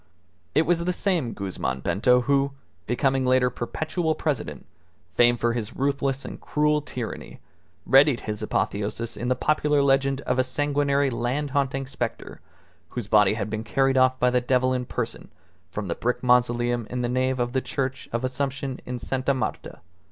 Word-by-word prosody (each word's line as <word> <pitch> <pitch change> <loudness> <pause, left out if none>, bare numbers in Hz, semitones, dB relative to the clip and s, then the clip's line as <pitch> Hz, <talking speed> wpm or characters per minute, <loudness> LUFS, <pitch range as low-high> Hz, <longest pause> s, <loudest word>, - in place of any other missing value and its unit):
It 155 - +5
was 170 +1 +1
the 180 +1 0
same 175 - 0
Guzman 95 -9 -3
Bento 125 - +3
who, 140 +1 +1 0.3
becoming 130 +2 +1
later 125 0 +3
Perpetual 160 +7 -2
President, 130 - -3 0.5
famed 120 +1 +4
for 120 0 +1
his 115 -3 -4
ruthless 140 0 -1
and - - -8
cruel 150 0 +1
tyranny, 125 -5 -6 0.5
readied 135 -1 +5
his 105 0 -4
apotheosis 105 +2 -2
in 120 - -4
the 130 - +2
popular 150 +1 +2
legend 135 0 +2
of 125 -2 -1
a - - +5
sanguinary 140 +1 +1
land 130 +5 -2
haunting 135 -1 0
spectre 125 -3 -5 0.5
whose 120 -5 -5
body 105 -1 +4
had 105 -1 -3
been 110 0 -3
carried 135 +2 +1
off 130 0 +4
by 125 0 +3
the 125 0 +2
devil 130 +1 +2
in 125 -1 -1
person 115 -2 -4 0.4
from 100 +2 -5
the 85 - -1
brick 125 +2 -2
mausoleum 120 -2 +2
in 125 0 -2
the - - +1
nave 130 +1 0
of 120 0 -1
the 130 - +1
Church 130 0 -3
of 115 +2 -2
Assumption 135 0 -2
in 125 0 -3
Sta. 130 +3 -1
Marta. 130 - -4
130 Hz, 170 wpm, -25 LUFS, 120-140 Hz, 0.5 s, It